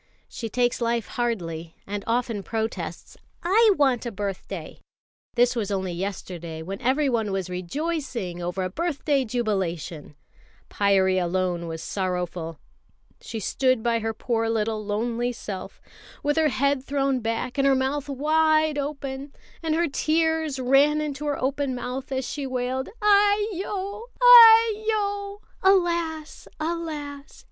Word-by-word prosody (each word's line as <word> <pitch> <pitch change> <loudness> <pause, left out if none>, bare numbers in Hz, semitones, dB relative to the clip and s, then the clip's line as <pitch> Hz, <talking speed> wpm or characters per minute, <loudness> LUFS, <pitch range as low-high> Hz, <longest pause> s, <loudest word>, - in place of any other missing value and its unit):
She 230 - -6
takes 245 +2 0
life 235 -1 0
hardly, 170 -9 -3
and 205 0 -4
often 230 -2 0
protests. 220 +2 -4 0.3
"I 425 +5 +5
want 265 -5 +2
a 235 - -4
birthday!" 200 -2 -5 0.6
this 245 0 +3
was 215 -4 -2
only 190 -2 -2
yesterday, 170 -3 -5
when 195 +4 -6
everyone 250 -5 +1
was 190 -2 -3
rejoicing 230 - -3
over 180 +2 -2
a 185 - -2
birthday 295 - 0
jubilation. 185 -10 -3 0.6
Pyârie 190 -2 +3
alone 175 -1 -1
was 160 0 -6
sorrowful. 180 -4 -3 0.6
She 225 - -6
stood 255 +3 +1
by 235 -1 +2
her 225 0 -2
poor 225 0 -1
little 220 -1 -1
lonely 230 +4 -1
self, 200 -5 -7 0.4
with 295 0 +1
her 320 -1 +3
head 280 0 +1
thrown 275 -1 0
back 235 +3 -3
and 275 - +4
her 270 - +5
mouth 270 +2 -1
wide 310 +2 +2
open, 280 -1 -5 0.3
and 320 -1 0
her 340 +1 +2
tears 320 0 0
ran 275 +4 +4
into 295 -1 -3
her 290 - -1
open 270 0 -1
mouth 250 +2 -5
as 260 -1 -2
she 285 -2 -4
wailed: 255 +1 -2
"Aiyo! 410 0 +2
Aiyo! 440 -4 +6 0.2
(Alas! 340 -5 +1
Alas!) 310 -3 -5
255 Hz, 130 wpm, -25 LUFS, 205-310 Hz, 0.6 s, Aiyo